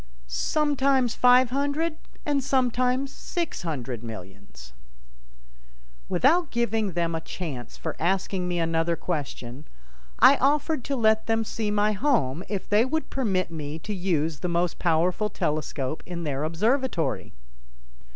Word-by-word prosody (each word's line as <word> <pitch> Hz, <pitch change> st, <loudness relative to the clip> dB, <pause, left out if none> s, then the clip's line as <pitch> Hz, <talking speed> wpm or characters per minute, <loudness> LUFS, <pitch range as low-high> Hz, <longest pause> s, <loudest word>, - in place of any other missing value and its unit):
"Sometimes 270 Hz, -, +1 dB
five 250 Hz, 0 st, +5 dB
hundred 285 Hz, +4 st, 0 dB, 0.3 s
and 285 Hz, -2 st, +1 dB
sometimes 255 Hz, 0 st, +1 dB
six 345 Hz, -3 st, -4 dB
hundred 130 Hz, -8 st, -4 dB
millions." 95 Hz, -, -10 dB, 1.4 s
Without 320 Hz, +4 st, +3 dB
giving 225 Hz, -4 st, 0 dB
them 170 Hz, -1 st, 0 dB
a 160 Hz, -, -2 dB
chance 150 Hz, -9 st, -6 dB
for -, -, -4 dB
asking 185 Hz, +1 st, 0 dB
me 175 Hz, -1 st, -1 dB
another 165 Hz, 0 st, +1 dB
question 145 Hz, -5 st, -5 dB, 0.5 s
I -, -, +7 dB
offered 290 Hz, +1 st, +1 dB
to 280 Hz, -, -1 dB
let 220 Hz, -3 st, +3 dB
them 225 Hz, 0 st, +2 dB
see 220 Hz, 0 st, -3 dB
my 210 Hz, 0 st, +2 dB
home 190 Hz, -, +1 dB
if 200 Hz, -2 st, -3 dB
they 210 Hz, +2 st, +4 dB
would 315 Hz, +5 st, -2 dB
permit 195 Hz, -10 st, 0 dB
me 155 Hz, -1 st, -5 dB
to 210 Hz, +6 st, -5 dB
use 165 Hz, -5 st, 0 dB
the 180 Hz, -, -2 dB
most 170 Hz, 0 st, 0 dB
powerful 175 Hz, +5 st, +1 dB
telescope 150 Hz, -3 st, -2 dB
in 170 Hz, -1 st, -5 dB
their 145 Hz, -1 st, -2 dB
observatory. 180 Hz, -, 0 dB
190 Hz, 130 wpm, -26 LUFS, 160-255 Hz, 1.4 s, I